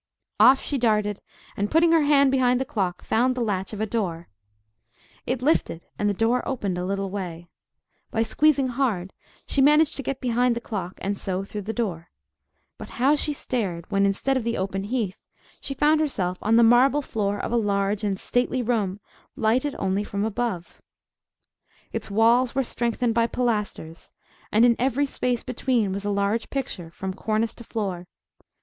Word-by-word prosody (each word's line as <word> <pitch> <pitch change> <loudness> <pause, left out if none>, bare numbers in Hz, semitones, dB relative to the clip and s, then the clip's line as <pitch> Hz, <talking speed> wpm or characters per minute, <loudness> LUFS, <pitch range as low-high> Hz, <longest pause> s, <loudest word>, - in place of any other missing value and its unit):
Off 265 +1 +7
she 280 - -2
darted, 210 -3 +1 0.3
and 205 +1 -1
putting 330 +1 +4
her 330 -1 +5
hand 280 -2 +4
behind 250 -2 +3
the 265 - -1
clock 190 -7 -2
found 250 +3 +1
the 250 - -2
latch 195 -4 -2
of 210 - -6
a 220 - 0
door. 185 -7 -3 1.0
It 250 0 -1
lifted, 255 - +1
and 205 - +2
the - - +1
door 230 +4 +2
opened 200 -9 -2
a 180 - -2
little 195 0 -2
way. 175 -4 -6 0.6
By 225 - 0
squeezing 275 +3 +2
hard, 230 -8 -1 0.3
she 275 - +1
managed 300 +3 +5
to - - -3
get 275 -1 -4
behind 245 -1 +1
the - - -2
clock, 190 -6 -5
and 200 0 -2
so 190 0 -2
through 205 +1 -6
the 210 +3 -4
door. 185 -8 -3 0.7
But - - -8
how 265 +4 +4
she 300 0 0
stared, 200 - -3
when 200 0 +3
instead 235 +7 0
of 260 - 0
the 235 0 -1
open 195 +1 -2
heath, 215 -4 -2 0.4
she 275 - -5
found 305 +3 +3
herself 185 -12 -1
on 220 +2 +2
the 235 - +6
marble 260 +5 +5
floor 205 -5 -2
of - - -4
a - - +1
large 200 -1 0
and 195 -2 -1
stately 250 +1 0
room, 210 -5 -1 0.4
lighted 250 +6 +1
only 195 +1 0
from 200 0 -2
above. 220 -5 -3 1.1
Its - - -4
walls 235 +5 +3
were 270 - +2
strengthened 235 -1 -1
by 230 0 +2
pilasters, 210 -10 -3 0.4
and 220 +3 +5
in 235 -1 +5
every 265 +3 +1
space 250 -3 -2
between 245 -4 0
was 200 +1 -4
a - - 0
large 200 +3 0
picture, 230 -11 -4
from 190 +3 -5
cornice 220 +3 -1
to 235 - -12
floor. 195 -6 -4
225 Hz, 180 wpm, -24 LUFS, 195-255 Hz, 1.1 s, Off